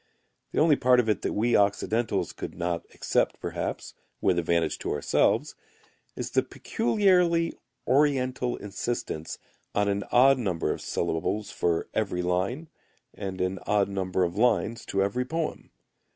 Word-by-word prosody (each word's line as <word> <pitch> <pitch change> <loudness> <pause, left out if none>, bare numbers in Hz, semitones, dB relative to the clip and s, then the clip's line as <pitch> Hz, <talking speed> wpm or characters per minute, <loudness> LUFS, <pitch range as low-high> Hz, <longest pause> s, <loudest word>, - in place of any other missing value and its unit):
The - - -6
only 155 -1 +5
part 125 -2 +4
of 120 - +1
it 105 - +1
that - - -2
we 115 +3 +2
Occidentals 105 +3 +1
could - - -7
not 85 0 -2
accept - - 0
perhaps, - - -4 0.3
with 90 - +2
advantage 85 -1 0
to - - -3
ourselves, 75 - +1 0.6
is - - -4
the - - +3
peculiarly 170 - +2 0.3
Oriental 130 -3 +2
insistence 100 -5 -4 0.4
on 105 0 +2
an 100 0 0
odd 135 +2 +6
number 95 -8 -1
of - - -4
syllables 85 +5 -2
for 85 -1 0
every 95 -4 -1
line 95 - -1 0.5
and 95 -2 -6
an 90 +1 -1
odd 100 -1 +2
number 95 -1 -1
of 85 0 -1
lines 115 -1 +1
to 95 0 +1
every 100 +6 0
poem. 160 +4 -4
105 Hz, 145 wpm, -27 LUFS, 95-125 Hz, 0.6 s, odd